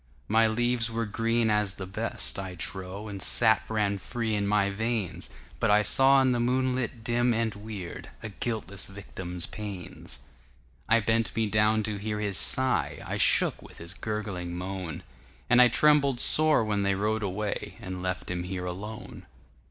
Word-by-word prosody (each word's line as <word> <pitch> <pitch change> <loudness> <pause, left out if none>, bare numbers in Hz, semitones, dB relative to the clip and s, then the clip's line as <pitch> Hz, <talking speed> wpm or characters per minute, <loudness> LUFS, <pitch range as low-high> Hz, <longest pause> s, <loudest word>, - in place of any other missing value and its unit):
My 110 +1 +4
leaves 120 +1 0
were 115 0 -2
green 115 +1 0
as 105 -2 +1
the 95 - -6
best, 105 +2 -3
I 95 -1 -6
trow, 95 +4 -3
And 100 -2 -3
sap 110 +2 +5
ran 105 -2 0
free 115 +1 -3
in 100 -1 -1
my 100 -1 +2
veins, 100 -5 -2 0.3
But - - +1
I 105 +1 +4
saw 135 +7 +6
in 130 - +2
the 120 - 0
moonlight 125 -1 -1
dim 120 +1 +1
and 115 -1 -1
weirdA 105 0 -9
guiltless 105 -5 -3
victim's 90 -3 -6
pains.I 75 - -5
bent 115 +1 0
me 110 - +1
down 105 +1 +2
to 105 -1 -3
hear 105 +1 -4
his 100 -2 +2
sigh;I 130 -1 +1
shook - - +2
with - - -15
his 85 +2 -7
gurgling 100 -4 -5
moan, 90 -2 -6 0.5
And 125 0 +7
I 125 - +8
trembled 140 0 +4
sore 155 -3 +5
when 105 -1 -1
they 100 0 +1
rode 110 +3 -1
away, 100 +1 -4
And 95 -4 -7
left 90 0 -4
him 90 -1 -3
here 90 0 -5
alone. 105 +5 -8
105 Hz, 160 wpm, -27 LUFS, 95-115 Hz, 0.5 s, I